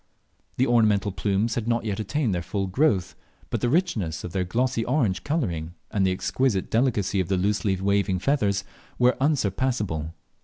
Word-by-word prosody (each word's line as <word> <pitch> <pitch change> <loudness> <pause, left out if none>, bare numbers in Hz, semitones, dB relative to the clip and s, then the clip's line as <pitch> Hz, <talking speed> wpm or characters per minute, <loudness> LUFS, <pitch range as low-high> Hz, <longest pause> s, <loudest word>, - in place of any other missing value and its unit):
The 130 - +3
ornamental 105 -4 +3
plumes 100 +4 0
had 115 -2 -2
not 115 -1 0
yet 105 -2 -2
attained 110 +2 0
their 90 - -1
full 95 +3 -2
growth, 95 - +1 0.4
but - - -1
the 120 - +1
richness 120 - 0
of 90 - -5
their 95 +1 0
glossy 120 +5 0
orange 110 -9 0
colouring, 85 - -2 0.2
and 100 -3 +1
the - - +2
exquisite 100 +2 0
delicacy 110 -5 +1
of 90 - 0
the 95 - +1
loosely 95 0 0
waving 100 -1 +1
feathers, 100 -4 +1 0.3
were 125 +1 +4
unsurpassable. 105 - 0
105 Hz, 165 wpm, -25 LUFS, 95-125 Hz, 0.4 s, were